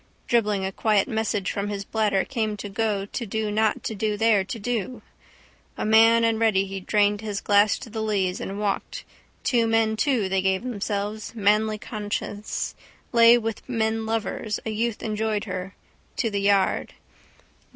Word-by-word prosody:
Dribbling 210 -5 +1
a 190 - -2
quiet 210 0 +2
message 220 -5 -1
from 200 0 -3
his 200 -1 -4
bladder 210 -3 +1
came 220 -5 -2
to 205 - -6
go 205 -1 -1
to 235 +4 -5
do 215 +1 -2
not 215 0 +1
to - - -3
do 210 0 -1
there 220 -2 +3
to 230 +5 -6
do. 225 0 -3 0.7
A - - -2
man 225 +1 +6
and 225 -1 +2
ready 210 -4 +3
he 195 0 -5
drained 205 +2 +1
his 210 -2 -3
glass 205 0 +3
to - - -10
the 220 0 -3
lees 195 -4 0
and 195 +1 -5
walked, 210 - -2 0.4
to 235 -3 +2
men 225 -1 +2
too 225 -3 +1
they 190 0 +1
gave 190 +2 +1
themselves, 210 -2 -3
manly 215 0 +2
conscious, 210 -1 -4 0.4
lay 235 0 +7
with 225 +1 -5
men 220 -2 -1
lovers, 220 -1 -2
a 220 - -2
youth 225 +1 -2
enjoyed 215 -1 -1
her, 185 -1 -5 0.4
to 225 -4 0
the 200 -1 -1
yard. 200 -1 +1
215 Hz, 170 wpm, -25 LUFS, 200-225 Hz, 0.7 s, lay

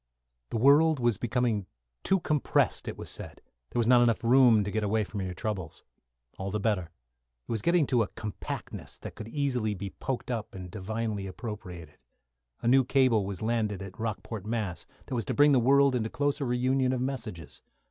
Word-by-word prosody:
The - - -2
world 145 +5 +5
was 120 -3 +1
becoming 120 -4 0 0.3
too 190 -1 +2
compressed, 150 -3 +1
it - - -4
was - - -5
said; - - -5 0.3
there - - -2
was 115 - +2
not 120 +1 +6 0.2
room 125 0 +6
enough 105 -2 +2
to 105 - -3
get 110 +1 -1
away 110 +1 +1
from 100 0 -5
your 90 -1 -4
troubles. 95 -7 -4 0.6
All 95 0 -3
the 105 +2 -2
better. 100 -5 0 0.6
It - - -6
was 110 -2 -1
getting 170 +1 +3
to 125 -3 +2
a 110 - +1
compactness 105 -2 -7
that - - -8
could 110 - -8
be 145 - -6
easily 125 -7 0 0.2
poked 130 -1 -3
up 115 -5 -4
and 90 -2 -8
divinely 105 0 -3
appropriated. 90 -6 -8 0.6
A - - 0
new 130 +2 +6
cable 125 -6 +3
was 100 0 -5
landed 110 -4 -1
at 95 -1 -10
Rockport, 110 -1 -4
Mass., 105 -5 -3 0.2
that 135 - -7
was 115 -4 -1
to - - -2
bring 145 0 +6
the 135 - +5
world 140 +2 +5
into 115 -3 -1
closer 145 +3 -1
reunion 130 +1 +1
of 125 - -1
messages. 115 - -5
115 Hz, 190 wpm, -29 LUFS, 105-130 Hz, 0.6 s, not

